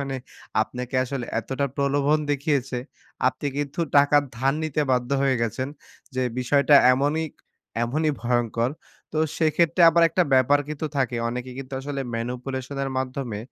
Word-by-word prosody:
মানে 135 Hz, -1 st, -3 dB, 0.5 s
আপনাকে 125 Hz, +2 st, -7 dB
আসলে 130 Hz, -1 st, -4 dB
এতটা 135 Hz, +5 st, -2 dB
প্রলোভন 140 Hz, +2 st, +2 dB
দেখিয়েছে, 135 Hz, -3 st, 0 dB, 0.5 s
আপনি 130 Hz, +3 st, 0 dB
কিন্তু 145 Hz, +3 st, -3 dB, 0.2 s
টাকা 145 Hz, +1 st, +6 dB, 0.2 s
ধার 135 Hz, +3 st, +1 dB
নিতে 155 Hz, -1 st, -1 dB
বাধ্য 125 Hz, 0 st, +1 dB
হয়ে 135 Hz, -1 st, +3 dB
গেছেন। 125 Hz, +4 st, -2 dB, 0.5 s
যে 130 Hz, -, 0 dB, 0.2 s
বিষয়টা 140 Hz, +3 st, +3 dB, 0.2 s
এমনই, 145 Hz, +5 st, +1 dB, 0.6 s
এমনই 155 Hz, +7 st, +1 dB
ভয়ংকর। 120 Hz, 0 st, 0 dB, 0.4 s
তো 155 Hz, -, -1 dB, 0.2 s
সেক্ষেত্রে 165 Hz, +2 st, +3 dB
আবার 170 Hz, 0 st, +3 dB
একটা 180 Hz, +3 st, +2 dB
ব্যাপার 130 Hz, +3 st, +5 dB
কিন্তু 155 Hz, +1 st, -3 dB
থাকে। 125 Hz, -3 st, 0 dB
অনেকে 125 Hz, +1 st, -5 dB
কিন্তু 135 Hz, 0 st, -8 dB
আসলে 140 Hz, 0 st, -4 dB
manipulation 125 Hz, +3 st, -4 dB
এর 135 Hz, -, -3 dB
মাধ্যমে 130 Hz, -4 st, -3 dB
135 Hz, 140 wpm, -24 LUFS, 125-145 Hz, 0.6 s, টাকা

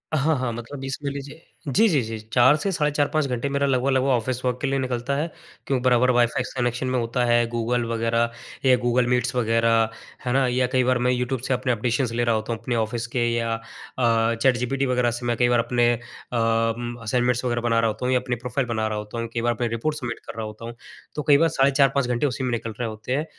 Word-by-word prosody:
हाँ, 155 Hz, +2 st, +2 dB
हाँ 130 Hz, -2 st, -1 dB
मतलब 120 Hz, +4 st, -7 dB
इसमें 135 Hz, +2 st, -3 dB
लीजिए 140 Hz, +3 st, -8 dB, 0.2 s
जी, -, -, -1 dB, 0.2 s
जी, 150 Hz, -8 st, +2 dB
जी, 110 Hz, -1 st, -5 dB
जी, -, -, -9 dB
4 130 Hz, +4 st, +6 dB
से 195 Hz, +6 st, -2 dB
साढ़े 150 Hz, -4 st, +1 dB
4-5 145 Hz, +1 st, +1 dB
घंटे 125 Hz, +2 st, -2 dB
मेरा 140 Hz, 0 st, 0 dB
लगभग-लगभग 130 Hz, 0 st, +1 dB
ऑफिस 125 Hz, 0 st, 0 dB
वर्क 125 Hz, -1 st, 0 dB
के 145 Hz, -, 0 dB
लिए 135 Hz, 0 st, 0 dB
निकलता 130 Hz, +1 st, -2 dB
है, 150 Hz, +4 st, -1 dB, 0.4 s
क्यों 130 Hz, -3 st, 0 dB
बराबर 125 Hz, 0 st, +3 dB
वाईफ़ाई 120 Hz, 0 st, +2 dB
से 130 Hz, -, -7 dB
कनेक्शन 120 Hz, +1 st, -1 dB
में 130 Hz, -, 0 dB
होता 115 Hz, +1 st, -1 dB
है। 120 Hz, 0 st, +3 dB
गूगल 120 Hz, +1 st, -1 dB
वगैरह 115 Hz, 0 st, 0 dB, 0.3 s
या 130 Hz, -1 st, +6 dB
गूगल 120 Hz, 0 st, +2 dB
मीट्स 125 Hz, 0 st, 0 dB
वगैरह 115 Hz, -1 st, +2 dB, 0.4 s
है 125 Hz, -, 0 dB
ना, 135 Hz, 0 st, +3 dB
या 125 Hz, +1 st, +1 dB
कई 130 Hz, +1 st, +1 dB
बार 130 Hz, 0 st, +2 dB
मैं 125 Hz, +1 st, +1 dB
यू 125 Hz, 0 st, 0 dB
ट्यूब 130 Hz, +1 st, -2 dB
से 135 Hz, -, +1 dB
अपने 125 Hz, 0 st, 0 dB
एप्रिशिएशन्स 120 Hz, +2 st, 0 dB
ले 120 Hz, -, +2 dB
रहा 115 Hz, -1 st, +2 dB
होता 110 Hz, +2 st, -2 dB
हूँ, 115 Hz, -, -6 dB
अपने 120 Hz, +1 st, -2 dB
ऑफिस 115 Hz, +1 st, -1 dB
के 120 Hz, 0 st, 0 dB
या 115 Hz, -1 st, 0 dB
अ, 115 Hz, 0 st, -1 dB
चैटजीपीटी 130 Hz, +1 st, +1 dB
वगैरह 125 Hz, -2 st, +1 dB
से 120 Hz, +1 st, -5 dB
मैं 120 Hz, 0 st, +1 dB
कई 120 Hz, -1 st, +3 dB
बार 120 Hz, -, +3 dB
अपने 120 Hz, 0 st, +2 dB
अ, -, -, -2 dB, 1.1 s
असाइनमेंट्स 125 Hz, +2 st, +1 dB
वगैरह 120 Hz, -1 st, 0 dB
बना 115 Hz, -1 st, +2 dB
रहा 115 Hz, -, +2 dB
होता 110 Hz, +4 st, -3 dB
हूँ 130 Hz, -, +2 dB
या 125 Hz, -, +4 dB
अपनी 125 Hz, -1 st, -3 dB
प्रोफाइल 125 Hz, +2 st, -3 dB
बना 110 Hz, -2 st, -1 dB
रहा 110 Hz, -, -3 dB
होता 105 Hz, +2 st, -6 dB
हूँ। 115 Hz, -, -3 dB
कई 115 Hz, -, -1 dB
बार 120 Hz, 0 st, +1 dB
अपने 120 Hz, +1 st, -2 dB
रिपोर्ट्स 150 Hz, +6 st, -2 dB
सबमिट 120 Hz, -1 st, -5 dB
कर -, -, -6 dB
रहा 110 Hz, -, -3 dB
होता 110 Hz, +1 st, -8 dB
हूँ, 115 Hz, 0 st, -7 dB, 0.4 s
तो 150 Hz, -, -2 dB
कई 145 Hz, -1 st, +7 dB
बार 165 Hz, +1 st, +3 dB
साढ़े 140 Hz, -2 st, +3 dB
4-5 135 Hz, -1 st, +2 dB
घंटे 125 Hz, +3 st, 0 dB
उसी 130 Hz, 0 st, -3 dB
में 125 Hz, -, -1 dB
निकल 115 Hz, -1 st, -3 dB
रहे 120 Hz, -, -1 dB
होते 110 Hz, +3 st, -8 dB
हैं। 150 Hz, +3 st, -1 dB
125 Hz, 250 wpm, -24 LUFS, 115-130 Hz, 1.1 s, कई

